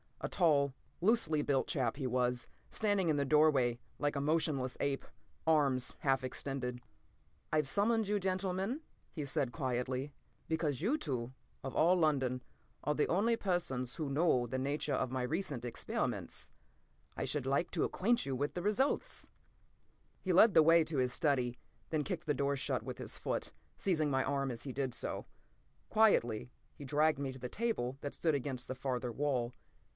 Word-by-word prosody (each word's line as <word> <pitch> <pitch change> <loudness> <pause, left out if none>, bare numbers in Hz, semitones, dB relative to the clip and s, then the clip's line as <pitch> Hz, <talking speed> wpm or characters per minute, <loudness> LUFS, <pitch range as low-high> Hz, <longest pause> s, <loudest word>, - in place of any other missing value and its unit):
A - - -1
tall, 145 -6 +3 0.3
loosely 175 -6 +3
built 140 -2 +1
chap 125 -6 0
he 140 - -3
was, 125 0 0 0.2
standing 205 -5 +1
in 150 - +2
the 140 - +1
doorway 135 -5 +4 0.2
like 145 0 0
a 140 - 0
motionless 145 -4 0
ape, 140 -1 -1 0.4
arms 140 -6 +2
half 135 -2 +2
extended. 130 -1 -3 0.7
"I've 150 -2 +2
summoned 220 +6 +2
you, 205 0 +1
gentlemen," 190 - -1 0.3
he 150 -4 -4
said 130 -2 0
quietly, 130 0 -2 0.4
"because 160 -4 -1
you 240 - +2
two, 125 - -3 0.3
of 135 - -5
all 175 +3 +5
London, 135 -7 +1 0.4
are 150 - +1
the 150 - +2
only 215 +7 +3
persons 170 - -1
who 155 -4 -3
know 140 -4 +3
the 130 +2 -3
nature 145 +2 -1
of 130 - 0
my 130 -1 -1
recent 145 -3 -2
experiments. 120 - -3 0.6
I - - -2
should 145 -4 -2
like 140 +6 +1
to - - 0
acquaint 235 +5 +1
you 135 -1 -1
with 145 +3 -1
the 175 - -2
results!" 215 +7 0 0.9
He 185 - 0
led 205 +4 +7
the 160 - +8
way 165 +1 +6
to 155 -2 -3
his 125 -1 +2
study, 125 -6 +1 0.3
then 155 -2 0
kicked 175 -2 -4
the 150 - +2
door 140 +1 +1
shut 135 - -2
with - - -6
his - - -6
foot, - - -2 0.2
seizing 160 -6 +1
my 135 -1 +2
arm 140 -1 0
as 120 -2 -5
he 135 - -5
did 130 -2 -2
so. - - -4 0.6
Quietly 125 - +3 0.2
he 145 - -9
dragged 150 +2 +2
me 140 -1 -2
to 130 - -10
the 125 0 -5
table 135 - -1
that 145 - -4
stood 160 -3 +1
against 130 -2 -3
the 130 - -4
farther 125 -2 -2
wall. 125 -2 0
140 Hz, 175 wpm, -34 LUFS, 130-165 Hz, 0.9 s, the